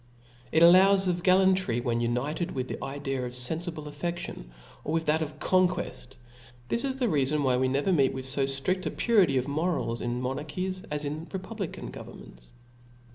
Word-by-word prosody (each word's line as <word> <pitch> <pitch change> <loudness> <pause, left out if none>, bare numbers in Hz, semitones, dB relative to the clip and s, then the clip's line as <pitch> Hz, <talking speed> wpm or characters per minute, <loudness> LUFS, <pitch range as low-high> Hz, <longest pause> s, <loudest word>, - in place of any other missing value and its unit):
It 160 - +4
allows 190 +3 +6
of 175 -1 0
gallantry 185 -8 +3
when 120 -1 -1
united 135 +9 -1
with 130 -2 -3
the - - -6
idea 135 -1 -3
of 125 0 -5
fenfible 160 +5 0
affedion, 170 - -5 0.4
or 155 - -3
with 165 0 0
that 155 +2 +2
of 155 -1 -4
conqueft 185 -7 0 0.2
\ 120 0 -23
this 235 - -1
is 270 -1 -1
the 260 -2 -1
reafon 150 - +1
why 130 -2 +2
we 130 +1 +2
never 140 +8 +1
meet 135 -5 +3
with 130 -1 -5
fo 135 +1 +2
ftrift 135 +8 -1
a - - 0
purity 195 - +3
of 130 - 0
morals 145 -6 -1
in 120 0 -2
monarchies, 150 +9 -3
as 150 0 -2
in 155 +3 -5
republican 195 -1 -6
governments. - - -12
150 Hz, 180 wpm, -28 LUFS, 130-185 Hz, 0.4 s, allows